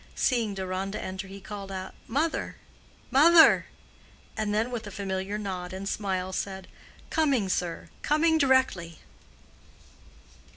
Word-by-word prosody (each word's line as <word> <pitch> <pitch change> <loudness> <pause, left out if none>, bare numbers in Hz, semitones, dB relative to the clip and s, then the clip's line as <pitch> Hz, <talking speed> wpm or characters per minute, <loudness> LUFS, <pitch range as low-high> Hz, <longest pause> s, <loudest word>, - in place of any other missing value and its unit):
Seeing 230 -6 +1
Deronda 190 +1 -3
enter, 190 +1 -5
he 195 +1 -9
called 200 0 -8
out 190 0 -6
"Mother! 305 +7 -1 0.6
Mother!" 320 +5 +7 0.7
and 215 -1 -1
then 220 +4 0
with 225 -3 -4
a - - -5
familiar 195 0 -3
nod 185 -3 -5
and 190 +1 -5
smile, 190 -3 -2
said, 190 -1 -4 0.4
"Coming, 280 -10 +2
sir—coming 300 - 0
directly." 260 - +2
200 Hz, 115 wpm, -27 LUFS, 190-250 Hz, 0.7 s, Mother